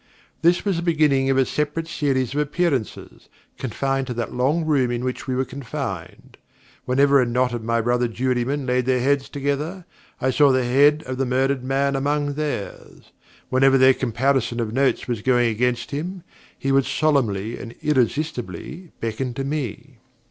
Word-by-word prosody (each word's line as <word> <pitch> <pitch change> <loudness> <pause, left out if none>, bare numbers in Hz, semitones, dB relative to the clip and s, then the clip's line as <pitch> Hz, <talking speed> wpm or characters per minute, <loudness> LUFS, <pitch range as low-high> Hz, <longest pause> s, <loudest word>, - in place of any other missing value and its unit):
This 170 +4 +3
was 195 -4 +1
the - - -2
beginning 150 -6 +2
of 135 - +2
a 135 - +4
separate 150 +4 -2
series 135 -5 -1
of 145 - -1
appearances, 150 -5 -2 0.3
confined 135 +2 -2
to 125 - -4
that 120 0 -3
long 145 +7 +1
room 140 -5 +2
in 120 0 -2
which 130 +1 -4
we 130 - -1
were 130 +1 0
confined. 135 -1 -7 0.5
Whenever 140 +2 +4
a - - +2
knot 125 +1 +1
of 120 -2 -4
my 115 +1 +1
brother 120 +1 +1
jurymen 130 +3 -1
laid 125 0 0
their 130 -1 +2
heads 140 +2 +1
together, 145 +6 -3 0.3
I 130 - +1
saw 145 +1 +5
the 130 -1 +2
head 145 +5 +4
of 130 0 -5
the 135 - 0
murdered 130 +1 +1
man 135 +1 0
among 145 +1 0
theirs. 145 -8 -5 0.4
Whenever 135 +1 +4
their 130 0 +6
comparison 125 0 0
of 115 -2 -2
notes 135 +1 +1
was 120 -4 -2
going 120 -1 +3
against 120 +2 -1
him, 170 +5 -4 0.3
he 135 - -1
would 135 0 +3
solemnly 120 -7 0
and 120 -1 -9
irresistibly 150 - -2
beckon 120 +2 -3
to 135 - -3
me. 135 -3 -5
135 Hz, 170 wpm, -22 LUFS, 125-145 Hz, 0.5 s, their